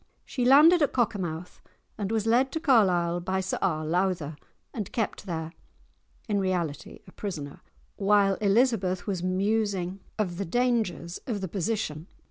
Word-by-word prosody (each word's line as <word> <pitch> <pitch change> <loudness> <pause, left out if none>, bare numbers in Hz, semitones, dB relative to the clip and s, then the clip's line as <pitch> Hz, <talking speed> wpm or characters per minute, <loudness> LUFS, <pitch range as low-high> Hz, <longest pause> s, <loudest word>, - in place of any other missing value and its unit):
She 250 -3 -2
landed 305 +7 +7
at 290 - +2
Cockermouth, 180 -8 -2 0.3
and 205 -1 -3
was 220 -1 0
led 250 +4 +3
to 320 - -1
Carlisle 180 - +3
by 190 +2 -1
Sir 190 0 -2
R. 155 -5 0
Lowther, 170 -2 0 0.4
and 215 -7 -5
kept 220 -3 -3
there, 160 -2 -4 0.7
in 205 -2 +1
reality 175 -6 -2
a - - -15
prisoner, 155 -9 -6 0.4
while 200 -1 +4
Elizabeth 200 -4 +2
was 190 -4 -2
musing 195 0 0 0.2
of 185 -5 -2
the 200 - -1
dangers 220 -5 0
of 225 -5 -2
the 190 - -3
position. 180 -4 -3
195 Hz, 145 wpm, -27 LUFS, 175-225 Hz, 0.7 s, landed